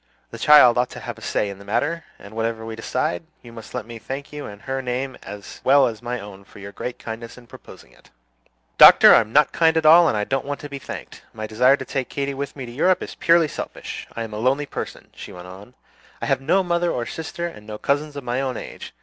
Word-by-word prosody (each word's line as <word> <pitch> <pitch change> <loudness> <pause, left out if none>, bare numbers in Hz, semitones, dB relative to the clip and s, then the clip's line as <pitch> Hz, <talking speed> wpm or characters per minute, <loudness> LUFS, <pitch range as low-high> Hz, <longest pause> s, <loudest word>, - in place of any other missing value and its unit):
"The - - -9
child 130 -5 +7
ought 125 - +1
to - - -9
have 120 -2 -7
a - - -18
say 105 - -1
in 100 -1 -8
the - - -12
matter; 145 +11 -1
and 100 - -13
whatever 115 0 -2
we 110 0 -6
decide, 130 +7 -2 0.2
you 120 -1 -13
must 115 -2 -10
let - - -4
me 115 0 -9
thank 135 +5 -7
you 150 0 -6
in 100 0 -11
her 135 -1 -3
name 130 +1 -3
as 105 -1 -10
well 140 0 +5
as 115 -2 -4
my 120 +1 -4
own 100 -1 -11
for - - -18
your 100 0 -9
great 120 +4 -6
kindness 115 +1 -8
in 125 - -14
proposing - - -15
it." - - -23 0.7
"Doctor, - - +10
I'm 110 -1 +4
not 150 +3 +4
kind 165 -1 +3
at 160 - 0
all, 165 +2 +8
and 110 - +1
I 105 - 0
don't 135 +5 -1
want 145 0 -3
to 145 - -8
be 140 -1 -6
thanked. - - -9
My 110 -1 -5
desire 125 +6 +3
to - - -7
take 135 -3 -3
Katy 140 0 -3
with 140 0 -5
me 135 -3 -6
to 120 - -9
Europe 180 +9 +2
is - - -7
purely 170 -1 +3
selfish. - - -7
I 115 - -3
am 110 -1 -8
a 105 - -4
lonely 135 +5 +1
person," - - -7
she - - -10
went 90 0 -10
on; 100 +7 -12 0.4
"I - - -4
have - - 0
no 185 +8 +2
mother 175 -1 0
or 120 - -2
sister, 165 +4 -5
and 105 -11 -8
no 105 -1 -6
cousins 145 +4 -1
of 140 - -6
my 125 +2 -1
own 130 -3 -3
age. - - -9
125 Hz, 255 wpm, -22 LUFS, 110-145 Hz, 0.7 s, Doctor